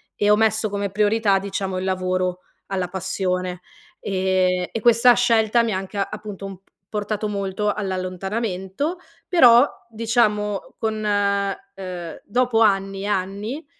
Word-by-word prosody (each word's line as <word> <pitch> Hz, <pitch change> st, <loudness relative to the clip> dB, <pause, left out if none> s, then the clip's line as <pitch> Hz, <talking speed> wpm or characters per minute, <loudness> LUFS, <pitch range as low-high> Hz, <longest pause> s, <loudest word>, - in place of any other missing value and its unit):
e 205 Hz, -, +1 dB
ho -, -, +7 dB
messo 220 Hz, 0 st, +2 dB
come 200 Hz, 0 st, -2 dB
priorità, 210 Hz, 0 st, +2 dB
diciamo, 195 Hz, -1 st, -3 dB
il 185 Hz, -, -3 dB
lavoro 185 Hz, -1 st, -1 dB, 0.3 s
alla 185 Hz, -2 st, -2 dB
passione. 180 Hz, -1 st, -2 dB, 0.4 s
Ehm, 185 Hz, -2 st, +1 dB
e 225 Hz, -, -3 dB
questa 240 Hz, +1 st, +6 dB
scelta 235 Hz, -1 st, +3 dB
mi 230 Hz, -, -1 dB
ha -, -, 0 dB
anche 190 Hz, +1 st, -6 dB
appunto 205 Hz, 0 st, -4 dB
un 195 Hz, -1 st, -7 dB
p -, -, -36 dB, 0.2 s
portato 210 Hz, 0 st, -2 dB
molto 200 Hz, 0 st, -1 dB
all'allontanamento. 190 Hz, -, -3 dB, 0.3 s
Però 250 Hz, -7 st, +7 dB, 0.2 s
diciamo 215 Hz, -3 st, 0 dB
con, 220 Hz, -1 st, -1 dB
uhm, 195 Hz, -4 st, -2 dB
dopo 245 Hz, +1 st, +1 dB
anni 195 Hz, -2 st, +2 dB
e -, -, -3 dB
anni, 205 Hz, -, -3 dB
200 Hz, 135 wpm, -22 LUFS, 190-220 Hz, 0.4 s, ho